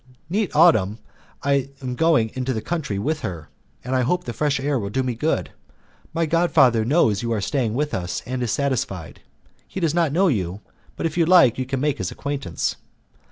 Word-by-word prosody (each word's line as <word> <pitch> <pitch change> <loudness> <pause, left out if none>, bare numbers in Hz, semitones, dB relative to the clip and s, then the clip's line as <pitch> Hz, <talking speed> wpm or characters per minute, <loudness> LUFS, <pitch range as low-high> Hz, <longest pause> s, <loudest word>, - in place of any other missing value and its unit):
Next 205 -4 -1
autumn 110 - +5 0.5
I 140 -1 +1
am 130 -2 -4
going 145 -6 +2
into 130 0 -2
the 110 - -3
country 155 - -2
with 150 +10 -1
her, 80 - -6 0.3
and 130 +2 -2
I 130 - +3
hope 180 +9 0
the 120 - -5
fresh 145 +3 0
air 140 -1 0
will 100 -2 -4
do 130 +6 -1
me 125 -1 -1
good. 150 +8 -1 0.6
My 165 +1 0
god 165 +2 +2
father 125 -7 +4
knows 115 - +2
you 115 -1 -2
are 110 - +1
staying 115 +1 -1
with 150 +2 -1
us 90 -1 -3
and 130 0 -3
is 120 -3 -1
satisfied. 110 - -2 0.5
He - - -6
does 165 -4 +1
not 165 -4 +2
know 185 +6 +3
you, 95 - -1 0.3
but - - -4
if 165 +1 -1
you 165 - +3
like 170 -10 +6
you 130 - -2
can 135 -1 -2
make 150 -1 0
his 90 - -2
acquaintance." 140 -11 -3
130 Hz, 205 wpm, -22 LUFS, 110-155 Hz, 0.6 s, like